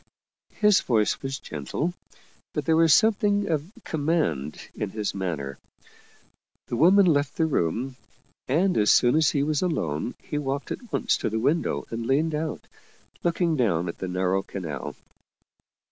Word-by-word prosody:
His 210 -2 +5
voice 110 -4 +1
was 135 0 -3
gentle, 100 - -4 0.6
but 150 -2 -2
there 160 - +3
was 165 0 +5
something 205 0 +3
of 160 +2 -2
com 150 -3 -4
mand 110 - 0
in 105 - -3
his 105 0 -3
manner. 80 -9 -4 1.1
The - - -4
woman 185 +9 +6
left 145 -5 +1
the 160 - +3
room, 125 - -1 0.5
and 180 - +2
as 105 - +4
soon 120 +2 +5
as 160 -1 +4
he 140 - +1
was 150 0 0
alone 85 - -1
he 150 - -4
walked 140 0 -3
at 240 -4 -6
once - - +1
to - - -2
the 110 - -2
window 145 +9 0
and 115 0 -4
leaned 155 +4 +2
out, 155 +1 -3 0.6
looking 170 -1 +1
down 95 - +1
at 85 - -6
the 95 - -3
narrow 90 +1 0
canal. 80 -8 -6
140 Hz, 160 wpm, -25 LUFS, 100-165 Hz, 1.1 s, woman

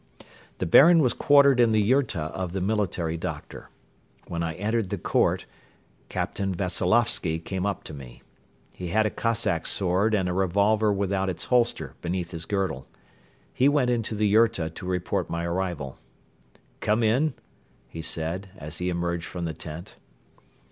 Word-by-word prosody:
The - - -2
Baron 165 - +7
was 130 -6 +3
quartered 140 -3 +5
in 120 -1 +5
the 110 -1 +3
yurta 105 - +1
of 90 -2 -4
the 95 - -1
military 90 -5 -1
doctor. 80 - -7 0.6
When 85 - -3
I 80 -1 -2
entered 105 +2 -1
the - - -2
court, - - +1 0.6
Captain 95 -2 -2
Veseloffsky 90 -1 +1
came 95 +3 -3
up 100 - -3
to - - -9
me. 65 -3 -11 0.5
He 90 - -6
had 110 +5 +2
a 105 - 0
Cossack 110 -7 0
sword 100 +3 +1
and 95 -3 0
a 90 - -1
revolver 100 +4 +2
without 95 -1 0
its 90 - -3
holster 120 -2 +1
beneath 85 0 -3
his 80 -2 -5
girdle. 95 -10 -2 0.7
He 135 +3 +4
went 140 -4 +2
into 115 -2 -1
the 105 +1 +1
yurta 100 -6 +3
to 90 - -8
report 90 -1 -1
my 85 0 -2
arrival. 85 -6 -3 0.8
"Come 110 +2 +1
in," 125 +7 +2 0.5
he 80 - -7
said, 85 +5 -3
as 75 0 -7
he 90 0 -1
emerged 85 -1 -2
from 90 -1 -5
the 80 - -3
tent. 80 +2 -9
95 Hz, 160 wpm, -26 LUFS, 85-110 Hz, 0.8 s, Baron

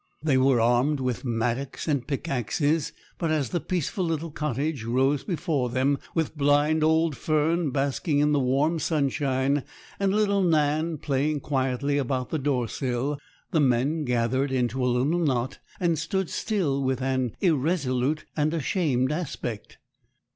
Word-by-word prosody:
They 150 -4 +2
were 130 -1 +4
armed 125 +5 +2
with 125 -2 -2
mattocks 120 +4 -2
and 140 -5 0
pickaxes; 145 +1 -1 0.3
but 165 - 0
as 150 -6 0
the 175 - -1
peaceful 180 +3 -2
little 165 -1 -2
cottage 150 -2 -2
rose 130 +4 +1
before 160 - -1
them, 130 +3 +1 0.2
with 160 -1 -1
blind 145 +2 +3
old 160 -1 +3
Fern 155 +2 +1
basking 140 +3 0
in 150 +1 +3
the 145 - +3
warm 140 +6 +1
sunshine, 140 -2 +1 0.4
and 195 -1 +2
little 200 -1 +2
Nan 155 -1 +1
playing 145 +1 -1
quietly 135 +1 0
about 130 -1 -2
the 160 - 0
door 130 -4 0
sill, 130 +4 -2 0.3
the 160 - +2
men 140 +4 +2
gathered 125 +2 0
into 125 0 0
a - - +2
little 130 +8 +1
knot, 130 -5 0 0.2
and 170 -4 +1
stood 190 +3 -2
still 170 -11 0
with 130 -1 0
an 130 -3 -1
irresolute 150 -4 +1
and 155 +1 +1
ashamed 140 -4 0
aspect. 135 -9 -5
145 Hz, 145 wpm, -26 LUFS, 130-160 Hz, 0.4 s, were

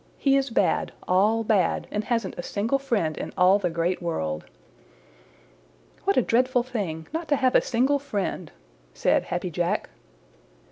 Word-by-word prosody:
He 275 -1 +3
is 275 0 +1
bad, 225 - +1
all 210 +5 +3
bad, 200 -6 +1
and 210 - -1
hasn't 230 0 -1
a - - -5
single 220 +9 -1
friend 210 - -1
in - - -5
all 185 +2 +5
the 180 -3 0
Great 170 +2 -1
World." 80 - -3 1.6
"What 200 - +2
a 255 - +5
dreadful 250 +2 +2
thing 195 -11 -4
not 325 0 -3
to 290 - +3
have 260 -2 +2
a - - +5
single 265 +4 +1
friend," 200 - -3 0.4
said - - +2
Happy - - -3
Jack. - - -1
215 Hz, 155 wpm, -25 LUFS, 180-255 Hz, 1.6 s, all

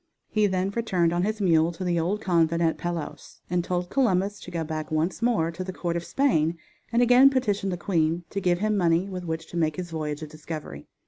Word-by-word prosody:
He 215 -1 +3
then 190 0 0
returned 185 -7 +1
on 175 - +1
his 215 +3 -1
mule 165 -4 +3
to 170 - -6
the 175 -2 +1
old 190 +6 -1
convent 170 -3 +2
at 160 -2 +1
Palos, 170 -2 -5
and 175 -1 +1
told 180 0 -2
Columbus 205 -6 +1
to - - -10
go 170 -2 -3
back 155 -1 -4
once 160 +6 -1
more 225 -9 +2
to 170 +2 -5
the 185 - -5
court 175 -2 -3
of 170 - -2
Spain 170 - +1 0.3
and 240 +1 +4
again 250 +3 +7
petition 210 -7 0
the 180 - -2
queen 165 -1 0
to 200 - -2
give 180 -1 +2
him 215 +3 0
money 175 -1 +2
with 185 -2 -6
which 160 -1 -3
to 175 - -5
make 155 -2 +1
his 180 -2 -6
voyage 155 -1 -3
of 155 - -7
discovery. 155 - -8
175 Hz, 230 wpm, -26 LUFS, 165-195 Hz, 0.3 s, again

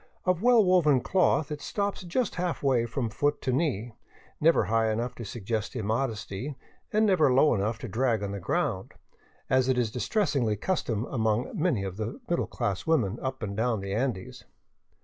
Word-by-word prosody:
Of 185 -1 +1
well 240 -2 +5
woven 160 -8 +4
cloth, 160 -4 +2
it 150 -1 -4
stops 200 -1 -2
just 190 +6 -1
halfway 140 -9 0
from 115 -1 -2
foot 145 +7 0
to 130 - 0
knee, 125 -6 0 0.5
never 165 +2 +4
high 115 0 +1
enough 120 +3 -2
to 120 - -8
suggest 110 +1 -4
immodesty 115 +2 -2 0.4
and 215 +1 +3
never 170 -9 +4
low 135 +4 +5
enough 110 +1 -1
to - - -5
drag 115 0 0
on 100 - -3
the 100 - -4
ground, 90 - -2 0.5
as 130 0 +2
is 125 -3 +2
the - - -17
distressing 125 - 0
custom 115 - -1
among 110 -2 0
many 160 - 0
of 95 -1 -5
the 110 - -4
middle 170 - 0
class 100 -1 -3
women 120 -10 +1
up 130 -2 -4
and 100 -1 -3
down 115 0 0
the 100 0 -4
Andes. 115 -4 -3
125 Hz, 175 wpm, -28 LUFS, 110-155 Hz, 0.5 s, well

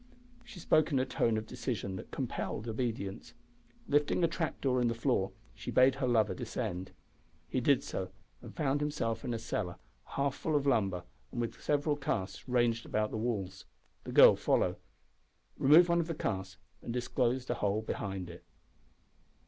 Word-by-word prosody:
She 185 - -11
spoke 155 -1 +3
in 140 - +2
a 130 - +2
tone 115 -4 +1
of 110 - -3
decision 105 -4 -4
that - - -9
compelled 110 - -4
obedience. 110 -4 -3 0.5
Lifting 145 +4 +2
a - - +6
trap 165 -1 -3
door 130 -2 +1
in 120 - +3
the 115 - 0
floor 115 -5 +1 0.2
she - - -8
bade 130 +1 +5
her 130 - +2
lover 115 -3 +3
descend. 90 +2 -4 0.6
He - - -1
did - - +3
so, - - -4 0.3
and - - -11
found 140 0 0
himself 115 -7 -1
in - - -3
a 115 - -1
cellar 105 -5 -3 0.3
half 140 -1 -1
full 155 +2 -2
of 145 -1 +2
lumber 100 -9 +1 0.3
and 120 - -5
with 120 -1 -3
several 145 0 +1
casks 95 -9 -3
ranged 120 -2 +1
round 105 0 0
the - - -1
walls. 100 -5 -3 0.4
The - - -6
girl - - +8
followed, - - +1 0.8
removed 160 +6 +7
one 170 0 +3
of 165 - 0
the 165 - -3
casks, 95 -6 -3 0.2
and - - -5
disclosed 125 +1 0
a 120 - -3
hole 105 +1 +1
behind 95 -4 -4
it. 85 0 -11
120 Hz, 175 wpm, -32 LUFS, 105-140 Hz, 0.8 s, girl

